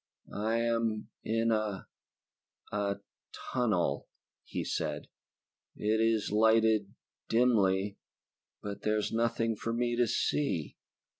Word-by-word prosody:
"I 110 +2 0
am 115 -2 0
in 115 +1 +1
a... 110 -3 -1 0.9
a... 100 -1 0 0.6
tunnel," 100 - +1 0.4
he - - -4
said. - - -2 0.7
"It 110 +1 +1
is 115 -2 +2
lighted, 110 -1 +3 0.3
dimly, 105 -5 +3 0.6
but 100 0 -5
there 110 0 +1
is 105 - -1
nothing 115 0 +1
for 115 +2 -3
me 120 0 0
to 120 0 +3
see." 110 - 0
110 Hz, 105 wpm, -31 LUFS, 105-115 Hz, 0.9 s, lighted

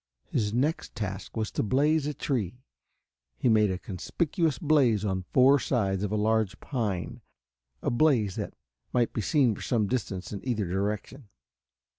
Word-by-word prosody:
His 105 -2 0
next 140 +8 -1
task 100 -2 -5
was 110 -1 -1
to - - -1
blaze 145 +6 +2
a 150 - -2
tree. 125 - -2 0.7
He 125 - +2
made 105 -2 +4
a 95 - -1
conspicuous 150 - -1
blaze 135 - +3
on 95 -2 -1
four 135 +2 +6
sides 100 -8 0
of 105 -1 -2
a - - 0
large 110 -1 +1
pine, 105 -10 -3 0.6
a - - +1
blaze 120 -7 +3
that - - -5 0.4
might 120 -2 +2
be 110 - -1
seen 130 - +3
for - - -9
some 115 -4 +1
distance 95 -5 -3
in 100 - -6
either 115 -6 -1
direction. 105 +6 -3
110 Hz, 160 wpm, -28 LUFS, 100-130 Hz, 0.7 s, four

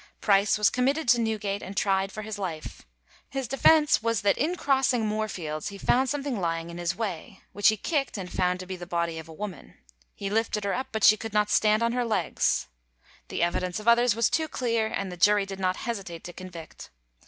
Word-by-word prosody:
Price 200 0 +3
was 210 0 +3
committed 275 +4 0
to 240 -1 +5
Newgate, 210 -3 -2
and 195 +1 -8
tried 195 -1 +1
for 215 - -6
his 215 -1 -6
life. 160 - -6 0.4
His 270 -2 -3
defence 295 +2 +4
was, 230 -1 0
that 200 - +3
in 320 +7 0
crossing 265 -6 +1
Moorfields 195 -8 -3
he 200 - -6
found 255 +6 +2
something 280 -5 -2
lying 165 -1 -2
in 170 - -8
his 175 +1 -1
way, 195 -3 -5
which 205 - +3
he 215 - +4
kicked 275 - -1
and 190 -2 -5
found 180 0 0
to - - -7
be 185 +1 -5
the 175 -1 -9
body 170 -2 -2
of 160 +1 -11
a - - -9
woman. 185 0 -8 0.4
He 200 0 -4
lifted 220 -1 0
her 200 - -1
up, 260 - -2
but 220 -2 -3
she 215 - +7
could 225 0 -7
not 210 0 +2
stand 215 +1 +3
on 230 - +2
her 245 +1 0
legs. 210 -8 0 0.6
The - - -2
evidence 180 +2 -1
of 210 - -10
others 235 -1 +5
was 230 -1 +3
too 315 -1 0
clear, 230 -6 0
and 195 -3 -3
the 180 - -8
jury 205 +2 +4
did 195 0 -7
not 185 -1 +1
hesitate 195 -8 -5
to 175 - -8
convict. 170 -4 -10
210 Hz, 220 wpm, -27 LUFS, 185-235 Hz, 0.6 s, she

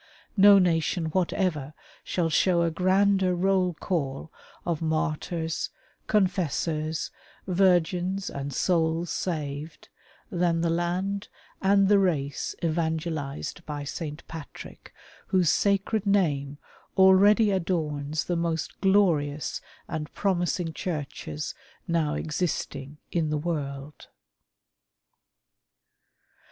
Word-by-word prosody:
No 200 0 +8
nation 165 -2 +1
whatever 170 -5 -1 0.3
shall 165 -3 -1
show 175 +2 +3
a 165 - +1
grander 190 +1 +3
roll 185 -1 +2
call 150 -2 -3 0.3
of 170 -3 -1
martyrs, 160 +1 -1 0.4
confessors, 165 -5 0 0.3
virgins, 185 0 +2
and 140 0 -4
sonls 165 +2 +1
saved, 150 -3 -4 0.4
than 170 -2 +1
the 165 -1 +1
land 180 +4 -1 0.3
and 195 0 +4
the 205 0 +5
race 150 -7 -1
evangelized 160 -1 -2
by 145 -1 -4
St. 150 +2 -6
Patrick, 160 -3 -10 0.4
whose 180 -4 +3
sacred 200 +1 +1
name 145 -8 +1 0.4
already 200 +3 +6
adorns 155 -5 -1
the 175 - -1
most 165 -1 -2
glorious 165 -7 +2 0.3
and 150 -1 -4
promising 175 -3 0
churches 145 - -4 0.3
now 165 -3 +1
existing 150 -3 -3
in 165 -3 0
the 150 - 0
world. 145 -3 -4
170 Hz, 95 wpm, -27 LUFS, 150-185 Hz, 0.4 s, No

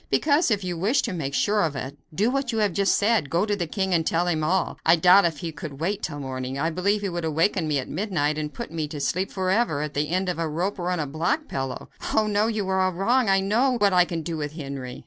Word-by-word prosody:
"Because, 300 +1 +3
if 205 -3 0
you 175 -2 -3
wish 215 +10 +2
to 230 - -2
make 140 -5 -3
sure 210 0 +2
of 155 -6 0
it, 135 +1 -5 0.2
do 205 +10 +1
what 270 -2 -1
you 225 - -2
have 210 -4 +1
just 195 0 +2
said 205 -8 +2
go 170 +4 +1
to 210 -1 0
the 175 -4 -3
king 190 +2 -1
and 165 -2 +3
tell 165 +2 +1
him 160 -3 0
all. 180 +4 0
I 165 - +6
doubt 180 +4 +6
if 165 -3 0
he 165 +3 -5
could 150 -4 -8
wait 195 +5 -1
till 145 -4 -4
morning. 130 -1 -4
I 160 +4 0
believe 200 +5 0
he 200 - -2
would 175 -1 -4
awaken 160 +2 +1
me 150 -2 +1
at 130 - -3
midnight 155 -4 -1
to 150 -1 -2
put 235 +9 -7
me 160 -2 -3
to 150 0 -7
sleep 185 +6 -1
forever 185 -5 0
at 150 - -5
the 145 +1 -1
end 185 +2 0
of 180 -2 -2
a 165 -1 -1
rope 180 +6 -2
or 175 0 -2
on 180 -1 -1
a 150 - -1
block 170 - -1
pillow." 135 -1 -4 0.3
"Oh! 220 - +4
no! 210 +1 +1
you 215 -4 -2
are 190 0 +1
all 185 0 +1
wrong; 230 +6 +2
I 195 0 +4
know 235 +7 +2
what 205 -3 +3
I 180 -1 +5
can 165 -2 -4
do 165 +1 -4
with 150 -1 -4
Henry." 140 -5 -6
175 Hz, 280 wpm, -25 LUFS, 155-200 Hz, 0.3 s, I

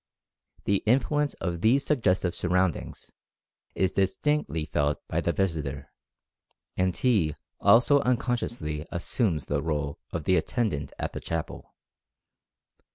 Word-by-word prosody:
The 100 - +2
influence 145 +5 +2
of 85 -2 -3
these 130 +7 +3
suggestive 95 - +1
surroundings 90 -1 -1 0.6
is 95 -1 +1
distinctly 95 - 0
felt 75 -1 0
by - - -1
the - - +1
visitor, 75 -8 -2 0.8
and 90 -2 0
he 100 - +2 0.2
also 120 +7 +6
unconsciously 120 - -1
assumes 85 - -1
the 70 0 -1
role 75 -2 -2
of 80 - -3
the 95 +4 +3
attendant 90 - -1
at - - -3
the - - -4
chapel. 80 -1 -5
90 Hz, 115 wpm, -27 LUFS, 75-120 Hz, 0.8 s, also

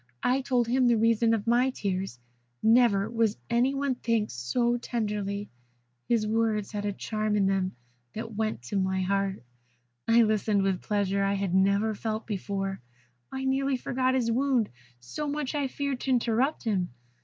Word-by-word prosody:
I 255 +2 +2
told 250 -3 +1
him 250 +1 +3
the 235 -1 +4
reason 230 +1 +3
of 225 -3 0
my 240 +3 +3
tears. 190 - -3 0.5
Never 220 -4 +4
was 225 -2 0
any 250 +4 +2
one 275 -1 0
thanked 230 -3 -1
so 235 - 0
tenderly. 205 -4 -3 0.6
His 230 -3 +2
words 215 -2 0
had 205 -1 -3
a 205 - 0
charm 215 +1 -2
in 200 -2 +3
them 190 -1 0 0.4
that 225 +1 -6
went 215 - -2
to 125 +11 -3
my 190 0 0
heart. 195 -3 -1 0.6
I 230 +1 +6
listened 215 -2 +1
with 195 -1 +2
a - - -18
pleasure 200 -1 0
I 195 0 +1
had 195 -2 -2
never 200 +3 +3
felt 220 +1 -3
before; 195 - -3 0.5
I 265 0 -4
nearly 270 0 +1
forgot 255 +1 0
his 235 -3 +1
wound, 255 -2 +1 0.3
so 295 - -5
much 290 -1 -2
I 290 -2 0
feared 280 -1 -3
to 270 - -4
interrupt 245 +3 +1
him. 195 -6 0
220 Hz, 170 wpm, -28 LUFS, 200-245 Hz, 0.6 s, I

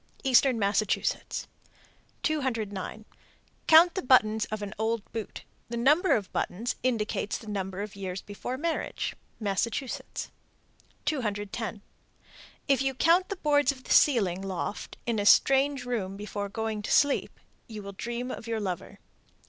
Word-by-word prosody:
Eastern 260 -1 +4
Massachusetts. 200 0 0 0.8
209. 220 - -2 0.6
Count 330 +2 +8
the 380 - -2
buttons 220 -4 +4
of 215 -1 -5
an 205 0 -5
old 220 -1 0
boot. 225 -2 -5 0.3
The 235 - -3
number 300 +10 +4
of 200 -4 -3
buttons 225 +7 -1
indicates 220 -4 -1
the - - -12
number 195 -2 -3
of 210 -1 -8
years 190 -1 -5
before 205 +5 -5
marriage. 330 +3 -2 0.2
Massachusetts. 230 +5 -2 0.7
210. 225 -5 -2 0.8
If 275 -3 +3
you 270 -1 0
count 340 +7 +4
the 400 - -2
boards 290 -5 +3
of 260 -2 -12
the - - 0
ceiling 195 - +4
(loft) 195 +1 -4
in 230 -3 0
a - - 0
strange 270 +2 +5
room 200 -6 -3
before 205 0 -4
going 220 0 -3
to 210 - -5
sleep, 285 -1 +2 0.3
you 215 -2 -8
will 200 - -6
dream 240 +5 -4
of 230 - -7
your 225 -1 -1
lover. 185 -4 -4
225 Hz, 140 wpm, -28 LUFS, 205-265 Hz, 0.8 s, Count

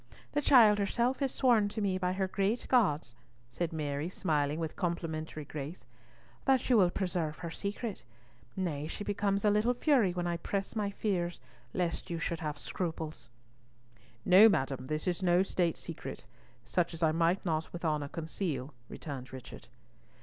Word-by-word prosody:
The 295 - +1
child 225 -7 +7
herself 235 +6 +1
has 275 -2 0
sworn 235 -6 +3
to 220 - -5
me 195 -3 0
by 180 0 0
her 190 0 0
great 200 +5 0
gods," 160 - +2 0.4
said 165 +7 -2
Mary, 150 0 -2
smiling 150 -4 0
with 160 -2 -3
complimentary 160 -3 -3
grace, 150 +4 -7 0.6
"that 265 -2 +3
you 240 - +7
will 185 -4 +5
preserve 175 -5 -2
her 170 - -6
secret—nay, 145 - -5
she 185 - -5
becomes 205 0 0
a 210 - +5
little 220 +4 +2
fury 245 - +3
when 175 0 -2
I 175 - 0
express 195 +4 -3
my 210 -2 0
fears 185 -4 -1 0.4
lest 175 -2 -1
you 170 - -2
should 165 0 -2
have 150 -2 -3
scruples." 160 -6 -4 1.0
"No, 195 +5 +9
madam, 135 -7 -1
this 155 +1 -2
is 180 +1 0
no 180 0 +4
state 175 -3 0
secret; 150 -5 -7 0.4
such 170 +5 0
as 165 - -4
I 160 - +5
might 170 +4 +1
not 160 -2 -1
with 175 0 -6
honour 150 -2 0
conceal," 155 -3 -4 0.2
returned 135 -5 -7
Richard. 130 -3 -10
175 Hz, 165 wpm, -32 LUFS, 155-200 Hz, 1.0 s, No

